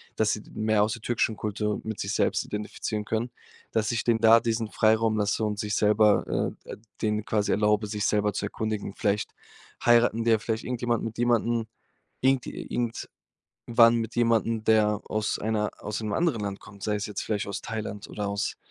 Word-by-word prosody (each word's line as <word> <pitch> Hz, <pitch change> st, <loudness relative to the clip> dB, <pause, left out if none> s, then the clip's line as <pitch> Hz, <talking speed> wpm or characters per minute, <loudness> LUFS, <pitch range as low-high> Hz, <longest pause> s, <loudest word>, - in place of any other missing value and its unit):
dass 110 Hz, -1 st, +2 dB
sie 105 Hz, -, -4 dB
d -, -, -17 dB
mehr 110 Hz, -1 st, +2 dB
aus 105 Hz, +1 st, 0 dB
der 120 Hz, -, -8 dB
türkischen 115 Hz, -2 st, 0 dB
Kultur 105 Hz, 0 st, -2 dB
mit 110 Hz, -1 st, -5 dB
sich 100 Hz, +1 st, -2 dB
selbst -, -, +1 dB
identifizieren 105 Hz, 0 st, -4 dB
können. 110 Hz, +3 st, -1 dB, 0.4 s
Dass 110 Hz, -1 st, 0 dB
ich 115 Hz, -, -1 dB
denen 115 Hz, -2 st, +3 dB
da 115 Hz, 0 st, +7 dB
diesen 115 Hz, -1 st, -1 dB
Freiraum 110 Hz, 0 st, +2 dB
lasse 105 Hz, +1 st, 0 dB
und 105 Hz, -1 st, -2 dB
sich 105 Hz, 0 st, -1 dB
selber, 105 Hz, 0 st, +3 dB
äh, -, -, -9 dB
äh, -, -, -7 dB, 0.2 s
denen 105 Hz, -1 st, 0 dB
quasi 105 Hz, -2 st, 0 dB
erlaube, 105 Hz, 0 st, +2 dB
sich 105 Hz, 0 st, -2 dB
selber 105 Hz, 0 st, +2 dB
zu 100 Hz, -, -2 dB
erkundigen. 105 Hz, -2 st, -3 dB
Vielleicht 105 Hz, 0 st, 0 dB, 0.5 s
heiraten 120 Hz, -1 st, +4 dB
die 115 Hz, -, +3 dB
ja 110 Hz, -, +4 dB
vielleicht 110 Hz, +1 st, -3 dB
irgendjemanden 120 Hz, -2 st, -1 dB
mit 115 Hz, 0 st, -5 dB
jemanden, 120 Hz, -1 st, +1 dB, 0.5 s
irgend 130 Hz, -1 st, +2 dB
irgendwann 120 Hz, -1 st, -5 dB, 0.7 s
mit 115 Hz, 0 st, -3 dB
jemandem, 115 Hz, -1 st, +2 dB
der 105 Hz, -1 st, +3 dB
aus 110 Hz, 0 st, -1 dB
einer 105 Hz, 0 st, -1 dB
aus 105 Hz, +1 st, -4 dB
'nem 105 Hz, -1 st, -3 dB
anderen 165 Hz, -10 st, +1 dB
Land 100 Hz, -1 st, -3 dB
kommt, 100 Hz, -2 st, -14 dB
sei 105 Hz, 0 st, 0 dB
es 105 Hz, -, -3 dB
jetzt 105 Hz, -, -4 dB
vielleicht 105 Hz, -2 st, -2 dB
aus 100 Hz, -, -4 dB
Thailand 110 Hz, -2 st, -5 dB
oder 105 Hz, -, -4 dB
aus, 100 Hz, 0 st, -2 dB
110 Hz, 190 wpm, -27 LUFS, 105-115 Hz, 0.7 s, da